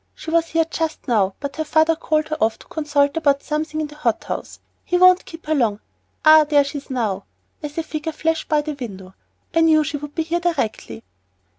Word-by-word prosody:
She 320 - -7
was 335 0 +2
here 325 0 +1
just 320 -1 -4
now, 200 -6 +2
but 280 0 -6
her 315 - 0
father 315 +1 +3
called 310 -1 -1
her 310 - -1
off 220 0 +1
to - - -16
consult 290 -2 +1
about 285 -3 +2
something 310 0 -3
in 310 - -1
the 295 0 -12
hot 240 -7 0
house. - - -6 0.2
He 355 - 0
won't 365 0 +6
keep 330 0 -11
her 310 - 0
long 225 -8 +1 0.5
Ah, 310 0 +8
there 295 -1 +3
she 280 +1 -5
is 280 - -19
now," 215 -7 -2 0.4
as 295 0 -7
a 330 - 0
figure 315 0 -4
flashed 320 +1 -2
by 305 -1 +3
the 305 0 -4
window; 195 -9 -8 0.4
"I 330 - +3
knew 315 -1 +5
she 295 0 -3
would 295 0 -9
be 325 - 0
here 335 +2 -1
directly." 265 - -2
305 Hz, 225 wpm, -21 LUFS, 280-320 Hz, 0.5 s, Ah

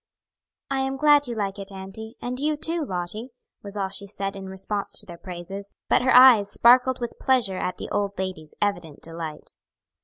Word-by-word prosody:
"I 270 - +1
am 265 0 -1
glad 290 0 +5
you 240 - -4
like 200 -2 -3
it, 195 0 -6
auntie, 195 +4 -8
and 250 +1 -3
you 300 +1 0
too, 330 +2 -1
Lottie," 190 +2 -3 0.3
was 200 0 -8
all 195 -1 -1
she 200 +1 -7
said 195 0 -4
in 195 -1 -7
response 195 +2 -3
to 210 - -4
their 175 -3 -9
praises, 190 +2 -8
but - - +4
her 255 - +1
eyes 245 -6 +8
sparkled 250 +3 +5
with 240 -1 -5
pleasure 240 -8 +2
at 180 - -3
the - - -7
old 200 -1 -1
lady's 185 -5 -5
evident 175 -7 -3
delight. 165 -2 -7
200 Hz, 190 wpm, -25 LUFS, 190-250 Hz, 0.3 s, eyes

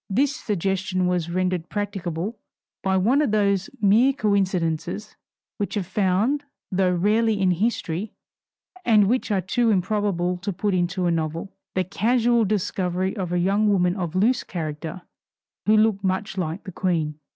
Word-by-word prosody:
This 275 +8 +1
suggestion 190 - -1
was 180 -2 0
rendered 180 -1 -1
practicable 200 0 -3 0.4
by 190 -1 +1
one 240 +10 +3
of 295 - +1
those 200 -2 +1
mere 220 +7 +4
coincidences 195 - -1 0.4
which 205 0 -2
are 200 - 0
found 200 - +1 0.3
though 185 -1 +2
rarely 215 +4 +2
in 190 -1 +3
history, 190 -1 -1 0.7
and 215 -6 +5
which 245 +3 0
are 200 -3 +1
too 230 +6 +1
improbable 190 -3 0
to 200 +3 -3
put 200 +2 -1
into 180 0 0
a 175 - +2
novel 165 +3 -3 0.2
the 185 - +2
casual 230 +4 +2
discovery 190 -2 -1
of 185 -5 -3
a 180 - +1
young 200 +4 +2
woman 180 -3 +2
of 175 -4 -4
loose 230 +7 +2
character 160 0 -5 0.6
who 215 +1 +5
looked 215 -2 +2
much 190 +2 -1
like 180 0 -3
the 190 - -7
Queen. 160 -5 -1
190 Hz, 150 wpm, -24 LUFS, 180-210 Hz, 0.7 s, and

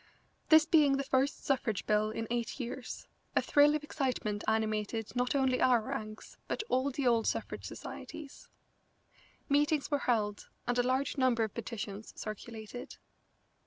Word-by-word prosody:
This 315 -1 +8
being 300 -5 +5
the 275 - -1
first 270 +1 0
suffrage 240 -7 0
bill 215 0 +2
in 225 +1 -3
eight 240 +2 -2
years, 250 0 -5 0.3
a - - +5
thrill 295 +1 +5
of 305 - -2
excitement 255 -8 -2
animated 220 0 -1
not 245 +2 +1
only 265 -2 +2
our 250 -2 +5
ranks 215 -3 -6
but - - -2
all 260 +2 +2
the 275 0 -3
old 235 -2 +3
suffrage - - -2
societies. 290 -3 -8 1.0
Meetings 290 +1 +2
were 290 - +2
held, 210 -3 0 0.2
and 245 +1 +1
a - - +7
large 260 +3 0
number 250 -3 +3
of 220 - -3
petitions 215 -2 -6
circulated. 220 +2 -7
245 Hz, 150 wpm, -32 LUFS, 220-275 Hz, 1.0 s, This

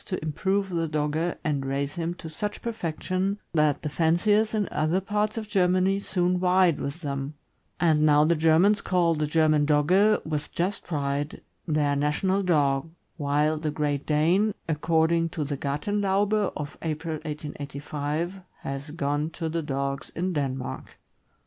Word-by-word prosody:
to 185 - -3
improve 195 +6 0
the 165 -2 -1
Dogge 155 +2 -1
and 145 -3 0
raise 140 +1 -2
him 170 0 -3
to 165 - -9
such 205 +6 -4
perfection 190 -2 -2 0.2
that 150 -3 +2
the - - -1
fanciers 175 +8 +2
in 210 -3 0
other 155 +4 +1
parts 210 +3 -1
of 220 -1 -4
Germany 185 0 +2
soon 180 -2 0
vied 180 -2 +3
with 145 +5 -4
them; 140 -1 -4 0.4
and 160 -3 +3
now 150 -1 +5
the 170 - +4
Germans 165 +6 +4
call 175 -2 +2
the 150 -1 -1
German 155 -1 +3
Dogge, 185 +9 +4
with 150 -2 -3
just 185 +4 -1
pride, 145 -2 -2 0.3
their 150 -2 +1
national 150 +7 +1
dog, 145 -5 +2 0.3
while 150 +1 +1
the 155 -1 -2
Great 145 -2 -2
Dane, 175 +8 +2
according 165 +1 +2
to 160 -2 -3
the 145 0 -3
Gartenlaube 200 +8 0
of 145 0 -6
April, 160 0 -3
1885, 150 +3 -4 0.2
has 135 +2 -5
gone 145 0 -1
to 165 0 -4
the 165 +1 -1
dogs 140 -1 -3
in 180 +2 -1
Denmark. 135 -4 -4
160 Hz, 150 wpm, -26 LUFS, 150-185 Hz, 0.4 s, now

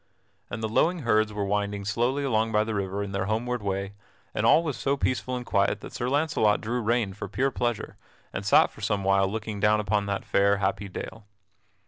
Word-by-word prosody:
And 110 - -5
the - - +1
lowing 165 +10 +1
herds 110 -2 +2
were 105 -1 -2
winding 100 0 -1
slowly 120 +7 0
along 110 -4 +1
by 105 -1 +3
the 110 0 -3
river 100 0 -2
in 100 - -6
their 100 -1 -1
homeward 120 +2 -1
way, 100 0 -3 0.4
and - - +1
all 165 - +6
was 150 -5 -2
so 140 +1 0
peaceful 130 -1 -1
and 125 -1 -5
quiet 100 0 +1
that - - -9
Sir 120 - -2
Launcelot 140 -7 +2
drew 120 +3 -2
rein 115 -3 0
for 100 0 -6
pure 130 +7 0
pleasure, 120 -3 -2 0.4
and - - -4
sat - - +5
for - - -14
some 100 -1 0
while 95 0 +3
looking 110 -1 -4
down 105 +1 +3
upon 100 0 0
that 100 -1 -2
fair, 100 0 +3
happy 100 0 -1
dale. 105 +3 -8
105 Hz, 210 wpm, -26 LUFS, 100-120 Hz, 0.4 s, all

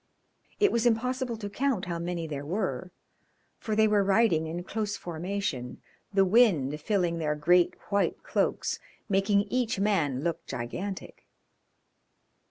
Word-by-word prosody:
It 415 -1 +4
was 235 +1 +2
impossible 250 +1 0
to 210 -2 -5
count 235 -1 -1
how 170 -2 -3
many 170 -1 -3
there 145 -3 -5
were, 185 +3 -2 0.7
for 215 - -2
they 220 0 +5
were 210 -1 +3
riding 195 -5 +3
in 170 +2 -4
close 205 +1 -3
formation, 170 -7 -4 0.3
the 195 -1 +4
wind 175 - +3
filling 175 -5 0
their 150 -2 0
great 175 +4 +3 0.2
white 200 0 +1
cloaks, - - 0 0.3
making 200 0 +3
each 235 +1 -1
man 160 -10 +1
look 170 -1 -2
gigantic. 185 +12 -6
195 Hz, 135 wpm, -28 LUFS, 165-215 Hz, 0.7 s, they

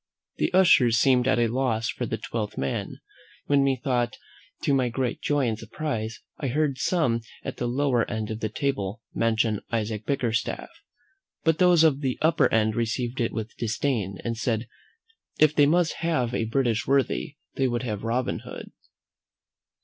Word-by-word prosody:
The - - 0
ushers 170 -11 +5
seemed 125 0 +4
at 130 -1 +3
a 120 - +3
loss 115 -2 0
for - - -3
a - - -3
twelfth 110 -3 -4
man, 70 0 -2 0.5
when, 140 -1 +3
methought, 130 -2 0 0.5
to 140 - +2
my 130 -2 +2
great 125 0 -2
joy 145 -3 +1
and 110 -1 -2
surprise, 115 -1 -4 0.2
I 140 - -2
heard 140 0 0
some 135 -9 +1 0.2
at - - -5
the 120 - -2
lower 125 -1 +1
end 110 -2 -3
of 110 - -4
the 110 - -2
table 110 -4 -2
mention 110 -2 +1
Isaac 110 -2 -2
Bickerstaff; 120 -5 -1 0.7
but 160 -1 +2
those 180 -3 +6
of 145 -3 +3
the 130 -3 -1
upper 160 +1 +3
end 110 -1 +2
received 120 +2 -1
it 115 - 0
with 110 0 -5
disdain, 110 -4 -1
and 115 -1 -2
said, 115 0 -1 0.7
"if 155 -1 +5
they 145 -2 +5
must 170 +2 +3
have 130 -8 0
a 115 - 0
British 120 0 0
worthy, 135 - +1 0.2
they 135 - +1
would 120 0 -2
have 105 -5 -3
Robin 120 +2 -1
Hood!" - - -9
120 Hz, 165 wpm, -26 LUFS, 115-140 Hz, 0.7 s, those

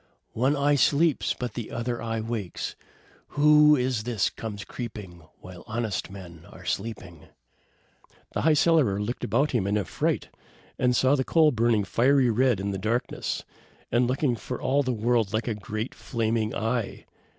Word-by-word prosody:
one 130 +6 +2
eye 145 +1 +2
sleeps, 145 +2 +2
but 125 -1 -5
the 120 -3 -5
other 120 0 -3
eye 115 -1 -2
wakes! 110 -5 -4 0.6
Who 150 0 +7
is 125 -4 0
this 110 -3 0
comes 105 -3 -7
creeping, 105 -8 -8 0.2
while 90 -1 -11
honest 110 -3 -3
men 90 -4 -11
are 90 - -13
sleeping?" 90 -5 -5 1.1
The - - -1
High 155 0 +4
Cellarer 150 -11 +3
looked 110 +4 -4
about 135 +6 +1
him 110 -7 0
in 105 +1 +1
affright, 100 - -1 0.5
and 125 -1 +2
saw 130 +2 +3
the 130 - 0
coal 155 +2 +4
burning 115 -3 +2
fiery 125 +4 +3
red 120 -2 +2
in 100 +1 -2
the 95 - -4
darkness, 115 +5 -2 0.5
and 120 +1 +3
looking 130 0 +1
for 125 +2 -6
all 140 +2 +2
the 130 -2 -1
world 115 -2 +1
like 110 +2 -1
a 115 - 0
great 110 +3 -5
flaming 115 -2 -2
eye. 115 0 -2
115 Hz, 160 wpm, -26 LUFS, 105-130 Hz, 1.1 s, Who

